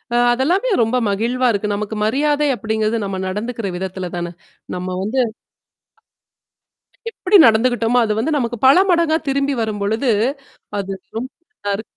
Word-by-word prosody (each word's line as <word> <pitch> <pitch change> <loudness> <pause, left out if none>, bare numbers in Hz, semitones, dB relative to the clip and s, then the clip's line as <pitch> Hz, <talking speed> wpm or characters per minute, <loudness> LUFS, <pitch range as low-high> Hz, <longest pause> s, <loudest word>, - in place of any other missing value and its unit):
அ - - +3 0.2
அதெல்லாமே 345 - +1
ரொம்ப 225 +3 +1
மகிழ்வா 235 +5 0
இருக்கு. 210 0 -1
நமக்கு 210 +1 -4
மரியாதை 295 +5 +1
அப்பிடிங்கிறது, 220 +1 -1
நம்ம 195 -1 -4
நடந்துக்கிற 215 +2 -3
விதத்தில 185 -1 -5
தானே. 175 0 -4 0.4
நம்ம 180 0 -4
வந்து 230 +6 -1 1.9
எப்பிடி 410 -2 +3
நடந்துக்கிட்டோமோ, 230 +1 +3
அது 215 - 0
வந்து 290 +8 0
நமக்கு 240 -2 -2
பல 275 +6 +7
மடங்கா 335 -3 +3
திரும்பி 280 +1 +1
வரும்பொழுது, 220 +3 -1 0.7
அது 195 -1 -3 0.2
ரொம் 250 +3 -3 0.2
நல்லாரு 205 - -4
225 Hz, 130 wpm, -19 LUFS, 205-265 Hz, 1.9 s, பல